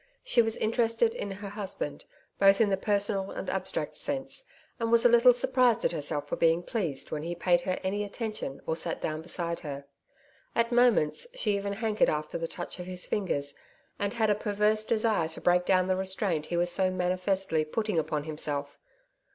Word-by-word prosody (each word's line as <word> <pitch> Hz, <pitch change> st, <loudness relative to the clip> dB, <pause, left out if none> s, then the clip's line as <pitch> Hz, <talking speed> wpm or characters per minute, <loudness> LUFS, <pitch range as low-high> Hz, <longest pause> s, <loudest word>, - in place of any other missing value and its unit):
She 380 Hz, -, +4 dB
was 225 Hz, -1 st, 0 dB
interested 230 Hz, 0 st, +1 dB
in 205 Hz, -, -4 dB
her 200 Hz, +1 st, -6 dB
husband 195 Hz, -8 st, -5 dB, 0.3 s
both 195 Hz, 0 st, +6 dB
in 220 Hz, -3 st, +4 dB
the -, -, +4 dB
personal 200 Hz, 0 st, 0 dB
and -, -, -4 dB
abstract -, -, -2 dB
sense, 275 Hz, -, -3 dB, 0.4 s
and 230 Hz, -1 st, -1 dB
was 235 Hz, 0 st, +5 dB
a -, -, +8 dB
little 240 Hz, +1 st, +7 dB
surprised 245 Hz, -1 st, +2 dB
at -, -, +3 dB
herself 145 Hz, -2 st, -2 dB
for -, -, -2 dB
being 165 Hz, +1 st, +3 dB
pleased 175 Hz, -, -3 dB
when 150 Hz, -, -3 dB
he 170 Hz, +2 st, -4 dB
paid 175 Hz, 0 st, +2 dB
her 185 Hz, +1 st, -2 dB
any 205 Hz, +2 st, -1 dB
attention 210 Hz, -, -5 dB
or 160 Hz, -, -1 dB
sat 165 Hz, 0 st, -2 dB
down 155 Hz, 0 st, -3 dB
beside 170 Hz, 0 st, -2 dB
her. 140 Hz, -2 st, -7 dB, 0.7 s
At 235 Hz, 0 st, +2 dB
moments, 240 Hz, -, +3 dB
she 210 Hz, -, +1 dB
even 200 Hz, 0 st, -2 dB
hankered 220 Hz, 0 st, +1 dB
after 150 Hz, +2 st, -2 dB
the 165 Hz, -, -2 dB
touch 175 Hz, +2 st, -7 dB
of 180 Hz, -, -6 dB
his 180 Hz, -1 st, -4 dB
fingers, 145 Hz, -8 st, -1 dB, 0.5 s
and 200 Hz, 0 st, -2 dB
had 220 Hz, -2 st, +2 dB
a -, -, +5 dB
perverse 210 Hz, +1 st, +1 dB
desire 220 Hz, -5 st, +2 dB
to 160 Hz, -, -9 dB
break 180 Hz, 0 st, +3 dB
down 185 Hz, -1 st, +4 dB
the 185 Hz, -, +2 dB
restraint 190 Hz, -4 st, -1 dB
he 175 Hz, -, -2 dB
was 175 Hz, 0 st, +2 dB
so 185 Hz, +1 st, +2 dB
manifestly 185 Hz, -2 st, 0 dB
putting 210 Hz, +3 st, -1 dB
upon 150 Hz, -1 st, -2 dB
himself. 145 Hz, -2 st, -2 dB
195 Hz, 190 wpm, -29 LUFS, 170-220 Hz, 0.7 s, a